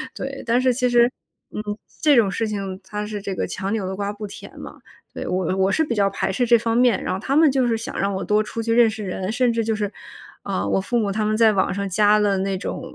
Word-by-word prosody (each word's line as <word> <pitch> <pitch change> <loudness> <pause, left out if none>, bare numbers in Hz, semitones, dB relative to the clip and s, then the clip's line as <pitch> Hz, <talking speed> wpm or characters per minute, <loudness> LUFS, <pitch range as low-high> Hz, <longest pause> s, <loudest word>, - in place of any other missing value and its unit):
对。 275 0 -5
但 235 +2 +2
是 255 -1 +3
其 250 0 +1
实， 240 0 +4 0.4
嗯， - - -4 0.4
这 295 -2 +5
种 210 -5 +4
事 225 - -1
情， 195 -3 -4
它 210 +2 -5
是 210 -1 -5
这 195 -1 -4
个 - - -1
强 195 +1 -4
扭 215 -4 -1
的 190 - -4
瓜 200 +1 -2
不 210 +1 -7
甜 200 - -10
嘛。 - - -10 0.3
对， - - -6
我 185 0 -1
我 190 +1 +2
是 320 - +2
比 250 - -2
较 200 -2 +2
排 195 - -2
斥 245 +6 0
这 235 0 +5
方 230 0 -1
面， 245 -3 +3
然 - - -2
后 185 - -3
他 265 +7 -1
们 310 -1 +6
就 260 -2 +1
是 230 -1 +1
想 225 - -6
让 200 0 0
我 190 - -3
多 210 +1 +2
出 225 +1 -5
去 230 0 0
认 235 -1 +5
识 220 -1 -6
人， 185 +2 -3
甚 245 0 +2
至 230 - 0
就 220 0 0
是 205 -2 -2 0.5
啊， 95 +2 -2
我 190 - +1
父 240 +5 -1
母 210 -4 0
他 215 +2 -1
们 215 0 0
在 225 -1 +5
网 195 -3 +1
上 200 +1 -2
加 210 +3 +4
了 205 -2 +2
那 195 0 -1
种 185 - -5
215 Hz, 295 characters per minute, -22 LUFS, 195-235 Hz, 0.5 s, 们